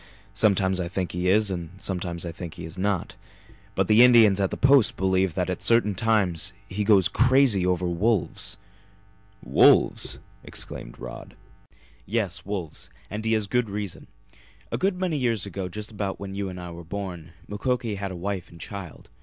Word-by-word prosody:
Sometimes 95 Hz, -2 st, +2 dB
I 90 Hz, -, -2 dB
think 90 Hz, 0 st, -3 dB
he 90 Hz, +1 st, -1 dB
is 105 Hz, +1 st, +3 dB
and 85 Hz, -3 st, -4 dB
sometimes 90 Hz, -3 st, -3 dB
I 85 Hz, -, -4 dB
think 85 Hz, +1 st, -8 dB
he 85 Hz, -2 st, -7 dB
is 80 Hz, -, -8 dB
not. 95 Hz, -1 st, -1 dB, 0.6 s
But -, -, +2 dB
the 110 Hz, +2 st, +6 dB
Indians 115 Hz, -5 st, +6 dB
at 95 Hz, -, +1 dB
the -, -, -5 dB
Post 135 Hz, -3 st, +4 dB
believe 95 Hz, -2 st, +1 dB
that -, -, 0 dB
at -, -, -3 dB
certain 115 Hz, -3 st, +3 dB
times 100 Hz, -4 st, +1 dB
he 100 Hz, +2 st, -2 dB
goes 100 Hz, -3 st, +5 dB
crazy 125 Hz, -6 st, +4 dB
over 90 Hz, 0 st, +1 dB
wolves." 95 Hz, +3 st, 0 dB, 0.9 s
"Wolves!" -, -, +4 dB, 0.3 s
exclaimed -, -, -7 dB
Rod. 60 Hz, -1 st, -9 dB, 0.7 s
"Yes, 105 Hz, -3 st, -1 dB
wolves. 95 Hz, -10 st, -5 dB, 0.2 s
And 105 Hz, +1 st, -4 dB
he 110 Hz, -, +2 dB
has 110 Hz, -2 st, +1 dB
good 120 Hz, +2 st, 0 dB
reason. 100 Hz, -2 st, -5 dB, 0.6 s
A -, -, -1 dB
good 185 Hz, -1 st, 0 dB
many 180 Hz, -5 st, 0 dB
years 115 Hz, -7 st, 0 dB
ago, 95 Hz, -1 st, -5 dB
just 105 Hz, +4 st, -7 dB
about 100 Hz, -2 st, -4 dB
when 100 Hz, -1 st, -6 dB
you 100 Hz, -1 st, -3 dB
and 90 Hz, 0 st, -7 dB
I 90 Hz, -1 st, -7 dB
were 85 Hz, 0 st, -9 dB
born, 85 Hz, -2 st, -6 dB
Mukoki 115 Hz, +1 st, -1 dB
had 100 Hz, -1 st, -4 dB
a 95 Hz, -, -6 dB
wife 95 Hz, 0 st, -4 dB
and 85 Hz, -, -15 dB
child. 95 Hz, -10 st, -9 dB
100 Hz, 180 wpm, -25 LUFS, 90-110 Hz, 0.9 s, the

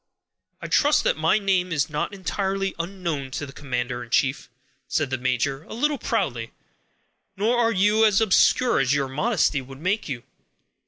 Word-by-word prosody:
"I -, -, -4 dB
trust 295 Hz, +1 st, +3 dB
that -, -, +2 dB
my 160 Hz, +5 st, +2 dB
name 190 Hz, -3 st, 0 dB
is 150 Hz, -1 st, +1 dB
not 150 Hz, +2 st, -3 dB
entirely 195 Hz, 0 st, -2 dB
unknown 170 Hz, -6 st, -3 dB
to 145 Hz, -, -4 dB
the 140 Hz, -, -11 dB
commander 120 Hz, -3 st, -3 dB
in 115 Hz, -, -13 dB
chief," 135 Hz, +4 st, 0 dB, 0.4 s
said 145 Hz, -4 st, -1 dB
the 130 Hz, -, 0 dB
major, 130 Hz, +2 st, -1 dB
a -, -, -9 dB
little 290 Hz, +4 st, 0 dB
proudly; -, -, -2 dB, 0.8 s
"nor 220 Hz, +5 st, +2 dB
are 230 Hz, -1 st, +3 dB
you 210 Hz, +2 st, +3 dB
as 210 Hz, -2 st, +4 dB
obscure 225 Hz, +3 st, +3 dB
as 135 Hz, +1 st, +2 dB
your 140 Hz, -1 st, 0 dB
modesty 150 Hz, -, +1 dB
would 135 Hz, +1 st, -12 dB
make 185 Hz, +3 st, -1 dB
you. 120 Hz, -3 st, -5 dB
165 Hz, 170 wpm, -24 LUFS, 135-205 Hz, 0.8 s, as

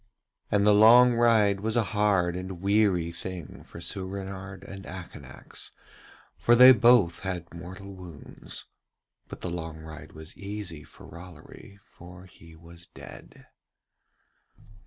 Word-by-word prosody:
And 100 Hz, 0 st, +2 dB
the 105 Hz, -, +6 dB
long 120 Hz, +4 st, +7 dB
ride 110 Hz, -4 st, +3 dB
was 110 Hz, +3 st, -3 dB
a 120 Hz, -, +3 dB
hard 100 Hz, -4 st, +1 dB
and 90 Hz, -1 st, -6 dB
weary 100 Hz, -4 st, +1 dB
thing 90 Hz, -2 st, -8 dB
for -, -, -12 dB
Soorenard 95 Hz, +1 st, -5 dB
and 95 Hz, 0 st, -10 dB
Akanax, 85 Hz, -8 st, -10 dB, 0.7 s
for 120 Hz, -, +4 dB
they 125 Hz, +2 st, +9 dB
both 120 Hz, -9 st, +4 dB
had 90 Hz, -3 st, -6 dB
mortal 90 Hz, +3 st, -10 dB
wounds; 90 Hz, -5 st, -11 dB, 0.6 s
but -, -, -10 dB
the 90 Hz, -, -4 dB
long 80 Hz, -2 st, -6 dB
ride 80 Hz, 0 st, -11 dB
was 80 Hz, +1 st, -10 dB
easy 100 Hz, -5 st, -7 dB
for -, -, -15 dB
Rollory, 90 Hz, +3 st, -13 dB
for 90 Hz, +1 st, -14 dB
he 80 Hz, -2 st, -17 dB
was 85 Hz, +1 st, -15 dB
dead. -, -, -13 dB
95 Hz, 130 wpm, -27 LUFS, 85-105 Hz, 0.7 s, they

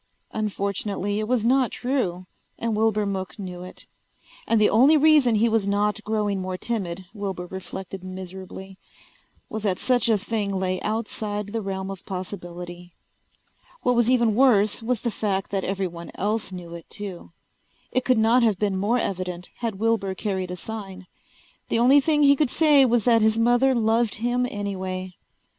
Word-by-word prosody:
Unfortunately 205 Hz, -1 st, -2 dB
it 215 Hz, -, -2 dB
was 240 Hz, -2 st, +1 dB
not 255 Hz, 0 st, +3 dB
true 240 Hz, -9 st, -2 dB, 0.3 s
and 230 Hz, -2 st, -1 dB
Wilbur 215 Hz, -1 st, +2 dB
Mook 190 Hz, -2 st, -4 dB
knew 180 Hz, -3 st, -7 dB
it. 185 Hz, -, -9 dB, 0.6 s
And 230 Hz, -, +3 dB
the 210 Hz, -, +5 dB
only 270 Hz, +8 st, +5 dB
reason 295 Hz, -6 st, +5 dB
he 220 Hz, +2 st, +3 dB
was 220 Hz, -3 st, +1 dB
not 210 Hz, +1 st, 0 dB
growing 210 Hz, -3 st, -1 dB
more 185 Hz, 0 st, -4 dB
timid, 190 Hz, -5 st, -3 dB
Wilbur 195 Hz, -4 st, -4 dB
reflected 190 Hz, +1 st, -7 dB
miserably, 190 Hz, +1 st, -8 dB, 0.7 s
was 220 Hz, -, -5 dB
that 195 Hz, -3 st, 0 dB
such 245 Hz, -2 st, +2 dB
a 220 Hz, -, +4 dB
thing 205 Hz, -1 st, -2 dB
lay 185 Hz, -1 st, -1 dB
outside 210 Hz, -1 st, -3 dB
the 225 Hz, -, -1 dB
realm 190 Hz, -1 st, -4 dB
of 195 Hz, -, -9 dB
possibility. 180 Hz, -2 st, -7 dB, 0.9 s
What 250 Hz, -, +3 dB
was 240 Hz, 0 st, +3 dB
even 235 Hz, -4 st, +3 dB
worse 215 Hz, -4 st, +4 dB
was 230 Hz, -1 st, -1 dB
the 235 Hz, -, -1 dB
fact 195 Hz, -3 st, -2 dB
that 195 Hz, -1 st, -1 dB
everyone 180 Hz, -3 st, -3 dB
else 210 Hz, 0 st, -1 dB
knew 175 Hz, -2 st, -8 dB
it 170 Hz, -1 st, -10 dB
too. 195 Hz, -6 st, -7 dB, 0.6 s
It 255 Hz, -, +1 dB
could 255 Hz, -2 st, +3 dB
not 225 Hz, +3 st, +4 dB
have 220 Hz, -5 st, +3 dB
been 200 Hz, -1 st, 0 dB
more 210 Hz, +6 st, +1 dB
evident 180 Hz, -4 st, -3 dB
had 230 Hz, -5 st, -3 dB
Wilbur 215 Hz, -3 st, 0 dB
carried 190 Hz, -3 st, -2 dB
a 180 Hz, -, -4 dB
sign. 195 Hz, -1 st, -7 dB, 0.6 s
The -, -, +1 dB
only 255 Hz, +5 st, +6 dB
thing 295 Hz, 0 st, +2 dB
he 280 Hz, 0 st, +7 dB
could 290 Hz, -2 st, +1 dB
say 295 Hz, -2 st, +5 dB
was 240 Hz, -3 st, +2 dB
that 230 Hz, -2 st, +5 dB
his 220 Hz, +1 st, +3 dB
mother 245 Hz, +3 st, +3 dB
loved 225 Hz, -1 st, +2 dB
him 245 Hz, +2 st, 0 dB
anyway. 185 Hz, -3 st, -4 dB
210 Hz, 170 wpm, -24 LUFS, 190-230 Hz, 0.9 s, he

